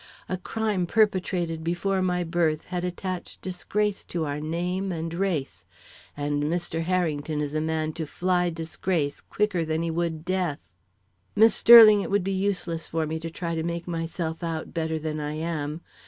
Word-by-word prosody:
A 185 - -1
crime 205 -2 -1
perpetrated 180 -6 +1
before 185 +3 0
my 180 -1 +1
birth 165 -2 0
had 180 -1 -4
attached 180 0 -4
disgrace 205 +2 -1
to 165 -2 -2
our 145 0 -3
name 180 +5 -2
and 165 -1 -3
race, 160 - -2 0.5
and 145 0 -1
Mr. 165 0 -1
Harrington 160 -4 0
is 145 -1 -2
a 155 - 0
man 155 0 -1
to 160 -1 -4
fly 180 +2 +1
disgrace 165 -2 -2
quicker 200 -5 0
than 160 +1 -1
he 165 - -1
would 165 -1 -2
death. 180 -5 0 0.8
Miss 220 +2 +6
Sterling, 220 -3 +9
it - - -4
would 200 -1 +2
be 195 - -1
useless 185 -4 -1
for 160 -1 -1
me 160 +1 -3
to 165 +1 -5
try 170 0 -4
to 160 - -1
make 170 +1 -3
myself 165 0 -3
out 165 -2 -4
better 160 -1 -1
than 155 0 -3
I 150 0 -3
am. 155 -1 -3
170 Hz, 170 wpm, -26 LUFS, 160-185 Hz, 0.8 s, Sterling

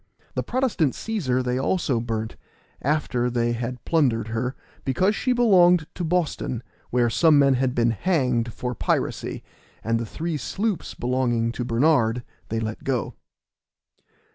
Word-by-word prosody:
The - - -1
Protestant 240 - 0
Cæsar 135 - -1
they 125 +1 -1
also 135 -4 +1
burnt, 115 -1 -3 0.5
after 130 -4 0
they 120 -1 0
had 120 +1 -4
plundered 120 -9 +1
her, 125 +3 -2 0.3
because 185 +10 +1
she 255 - 0
belonged 180 -9 +5
to 180 - -4
Boston, 160 -8 -1 0.3
where 120 -1 +2
some 150 +6 +4
men 140 -1 +5
had 130 0 0
been 120 -1 +3
hanged 125 - 0
for 125 +3 -4
piracy, - - -2 0.4
and 115 +1 +1
the 115 - -3
three 160 +6 -3
sloops 205 +4 -2
belonging 120 -2 0
to 125 - -4
Bernard 120 -1 +2 0.3
they 115 - -1
let 110 -1 -4
go. 130 -4 -1
125 Hz, 140 wpm, -24 LUFS, 120-160 Hz, 0.5 s, belonged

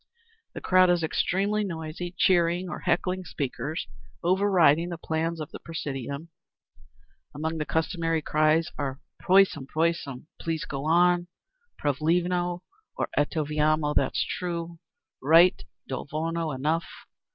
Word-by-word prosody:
The - - -6
crowd 185 0 +5
is 175 -1 +2
extremely 200 +6 0
noisy, 170 -1 -5
cheering 175 0 +3
or - - -5
heckling 180 +1 0
speakers, 155 +1 -4 0.4
over 190 +4 +2
riding 170 -2 +4
the 170 - -5
plans 165 +1 -2
of 155 - -6
the - - -8
presidium. 140 -1 -5 1.1
Among 160 +2 -3
the 150 - -3
customary 165 -1 0
cries 155 +2 +2
are: 135 -1 -3 0.2
"Prosim! 185 -7 +3 0.7
Please! 165 -2 -3
Go 135 0 -5
on!" 175 +2 +3 0.5
"Pravilno!" 175 +4 0 0.3
or - - -1
"Eto 150 +1 +1
vierno! 150 0 +1
That's - - +1
true! 170 -1 -4 0.4
Right!" 165 +6 +5 0.2
"Do 130 +1 -5
volno! 165 +1 -2
Enough!" 155 +5 -1
165 Hz, 120 wpm, -27 LUFS, 155-175 Hz, 1.1 s, crowd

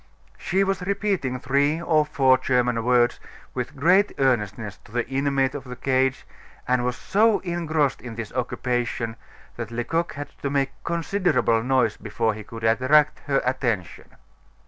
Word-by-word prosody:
She 195 +1 +1
was 195 -1 -1
repeating 190 -9 -1
three 140 +5 +1
or 155 -3 +2
four 135 -3 +4
German 125 -3 +1
words 120 0 +3 0.3
with 125 +3 -4
great 180 +8 +3
earnestness 110 -5 0
to - - -16
the 120 0 -1
inmate 135 0 0
of 145 - -6
the 125 -2 -8
cage, 130 0 0 0.4
and 125 -1 +2
was 125 0 -1
so 215 - +2
engrossed 160 -5 -1
in 120 -2 -8
this 115 -2 -6
occupation 120 -2 -2 0.4
that 115 -3 -5
Lecoq 120 +9 -2
had 145 0 -6
to 140 - -1
make 135 -1 0
considerable 170 - +1
noise 125 -3 +1
before 110 +1 -1
he 105 - -8
could 115 +2 -10
attract 130 +7 +3
her 135 -1 +1
attention. 120 -8 -2
130 Hz, 150 wpm, -24 LUFS, 120-150 Hz, 0.4 s, four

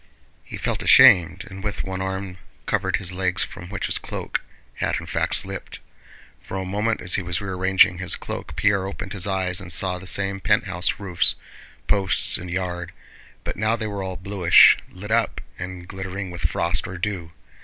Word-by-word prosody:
He - - -8
felt - - -2
ashamed, 90 +1 +6
and 95 -1 -9
with 105 -1 -3
one 95 0 -4
arm 95 -1 -4 0.3
covered - - 0
his 95 -3 -3
legs 90 0 0
from 90 - -9
which 105 - -3
his - - 0
cloak - - -4 0.4
had - - 0
in - - -9
fact - - 0
slipped. - - -3 0.6
For 95 - -6
a 95 - -3
moment 105 +4 -1
as 90 - -1
he - - +2
was 90 0 -1
rearranging 95 -2 +3
his 90 - +2
cloak - - -7
Pierre 100 -2 +2
opened 100 - -6
his 95 -2 -2
eyes 95 -1 0
and 90 -2 -7
saw 90 +1 +1
the 95 - -10
same 100 0 +2
penthouse 90 -1 +1
roofs, 90 -4 +2 0.5
posts, 95 -3 +2
and 90 - -8
yard, 90 -1 -3 0.5
but - - -4
now 110 +2 +1
they 110 -1 -4
were 100 -2 -4
all 95 -1 -4
bluish, 95 -2 +6
lit 105 +4 -9
up, 115 0 +1 0.2
and 90 -1 -7
glittering 95 0 -5
with 85 -3 -2
frost 85 +1 0
or 95 - -7
dew. 90 -3 -4
95 Hz, 185 wpm, -23 LUFS, 90-100 Hz, 0.6 s, ashamed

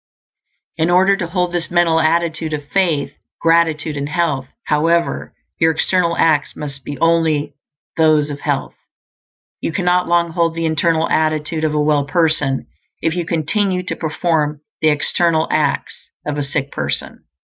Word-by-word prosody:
In 160 +1 +1
order 190 +3 +4
to 175 - -3
hold 180 0 -1
this 175 -1 -2
mental 175 -2 +3
attitude 160 0 0
of 145 -1 -4
faith, 170 -7 +1 0.3
gratitude, 165 -2 +2
and 140 0 -3
health, 150 -6 -1 0.2
however, 165 +3 0 0.2
your 160 - +4
external 170 +1 +1
acts 155 -3 +2
must 140 -2 -7
be 145 - -6
only 160 -2 +1 0.4
those 155 -2 +3
of 145 - -6
health. - - -2 0.9
You - - -2
cannot 180 +1 +1
long 170 -1 +2
hold 165 -1 0
the 165 0 -2
internal 160 +1 +1
attitude 155 0 0
of 155 -1 0
a - - +2
well 150 -1 +2
person 145 -3 +1 0.4
if 165 +1 +1
you 175 -2 -2
continue 180 +3 0
to - - -3
perform 155 -2 -1 0.2
the 155 - +4
external 160 +2 +1
acts 150 -3 -1 0.2
of 150 - -2
a 145 - -2
sick 140 0 -3
person. 75 -1 -4
160 Hz, 155 wpm, -18 LUFS, 150-170 Hz, 0.9 s, order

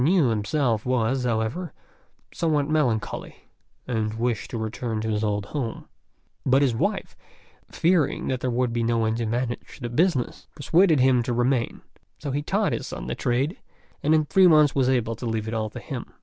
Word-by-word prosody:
Niu 160 -3 +4
himself 115 +1 0
was, 125 +1 0
however, 120 +8 -1 0.6
somewhat 150 -4 +1
melancholy, 125 -9 -1 0.5
and 110 -3 -1
wished 115 -1 -1
to 120 - -4
return 110 0 -3
to 110 - -2
his 105 0 0
old 105 -1 -1
home; 120 -1 -4 0.6
but 135 +2 +4
his 130 -4 +2
wife, 195 - -2 0.6
fearing 170 -4 +1
that 130 -1 -1
there 130 - -1
would 120 0 0
be 120 - 0
no 115 0 +1
one 110 -1 +1
to 115 -1 -2
manage 120 +2 -3
the 120 -3 -4
business, 140 0 0
persuaded 165 +1 +3
him 130 -1 +4
to 120 +1 -2
remain; 120 0 0 0.4
so 145 - -5
he 145 +2 -1
taught - - 0
his - - -3
son - - -6
the 65 - -3
trade, 130 - 0 0.4
and 155 +2 +3
in 155 -1 +2
three 190 +4 +5
months 150 -4 +5
was 130 -2 +2
able 120 -3 +1
to 115 +2 -6
leave 110 -1 -2
it 110 - -3
all 110 -1 -1
to - - -8
him. - - -7
125 Hz, 190 wpm, -25 LUFS, 115-145 Hz, 0.6 s, three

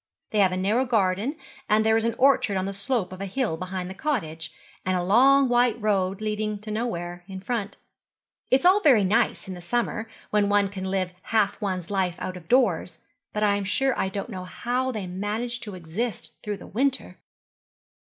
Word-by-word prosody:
They 215 - +1
have 190 -2 +5
a 185 - -2
narrow 210 +7 +2
garden, 220 - +1 0.3
and 215 +1 +4
there 220 0 +4
is 225 0 +2
an 230 - 0
orchard 255 -7 +4
on 185 - -1
the 195 - -3
slope 200 -2 -1
of 185 - -8
a 195 - -3
hill 220 -3 -1
behind 185 +1 -4
the 190 - -6
cottage, 165 - -3 0.3
and 185 0 +1
a 175 - -1
long 265 +8 +5
white 240 -2 +3
road 195 -2 0
leading 215 0 -2
to 215 0 -7
nowhere 175 -6 -3
in 190 -1 -7
front. 210 0 -3 0.7
It 260 - +4
is - - -5
all 375 +3 +7
very 265 - +5
nice 195 +1 +1
in 190 - -5
the 180 - -9
summer, 225 +3 -2 0.2
when 205 -1 +2
one 205 -1 +3
can 190 -1 -6
live 190 -1 -1
half 215 -3 +1
one's 185 -3 -3
life 185 -3 0
out 185 - -5
of 175 -3 -11
doors, 195 -9 +2 0.3
but 210 - -1
I 200 -1 +3
am 200 - -3
sure 255 +7 +1
I 190 - 0
don't 200 +4 -5
know 185 -2 -6
how 250 +7 -2
they 215 -5 -4
manage 210 +7 -3
to 210 -5 -7
exist 185 +7 -4
through 210 -1 -4
the - - -11
winter.' 265 +6 -1
205 Hz, 205 wpm, -25 LUFS, 185-235 Hz, 0.7 s, all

